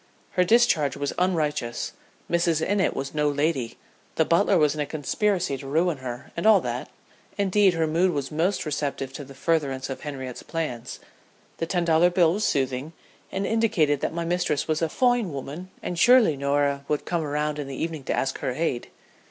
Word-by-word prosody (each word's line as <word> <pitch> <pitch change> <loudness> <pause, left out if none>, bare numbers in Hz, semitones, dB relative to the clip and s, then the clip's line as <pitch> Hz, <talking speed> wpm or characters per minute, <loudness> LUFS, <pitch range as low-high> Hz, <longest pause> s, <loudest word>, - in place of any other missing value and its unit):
Her 180 - +3
discharge 180 -8 +3
was 145 0 -2
unrighteous; 155 -9 -1 0.4
Mrs. 170 -2 +1
Innitt 200 -1 +1
was 135 0 -4
no 150 -1 +2
lady; 145 -4 -1 0.4
the - - +3
butler 190 +3 +3
was 150 -3 +3
in 155 - -3
a - - 0
conspiracy 170 +1 -1
to 135 - -8
ruin 165 +3 +1
her 125 0 -7
and 170 +6 0
all 215 -3 +7
that; - - -4 0.5
indeed, 200 -2 +3
her 165 -1 +1
mood 170 +4 +2
was 145 -5 -3
most 175 +5 0
receptive 140 -3 -3
to 145 - -6
the 135 0 -13
furtherance 135 -4 -1
of 135 - -6
Henriette's 130 -4 -6
plans. 130 -7 -5 0.6
The 165 - -2
ten 175 0 0
dollar 165 +1 +4
bill 175 -2 +3
was 210 +3 -2
soothing, 135 +3 -1 0.4
and 195 +1 -2
indicated 205 -11 +2
that - - -1
my 170 0 -3
mistress 175 -4 0
was 155 0 0
a 165 - +1
"foine 245 -3 +2
woman" 145 +6 -6
and 175 - -3
"surely 240 - +6
Norah 140 0 0
would 150 - -1
come 170 -2 -1
'round 150 0 -2
in 145 - -4
the 135 - -6
evening 160 -1 -4
to - - 0
ask 135 - -1
her - - -2
aid." 130 -4 -2
155 Hz, 190 wpm, -25 LUFS, 140-180 Hz, 0.6 s, all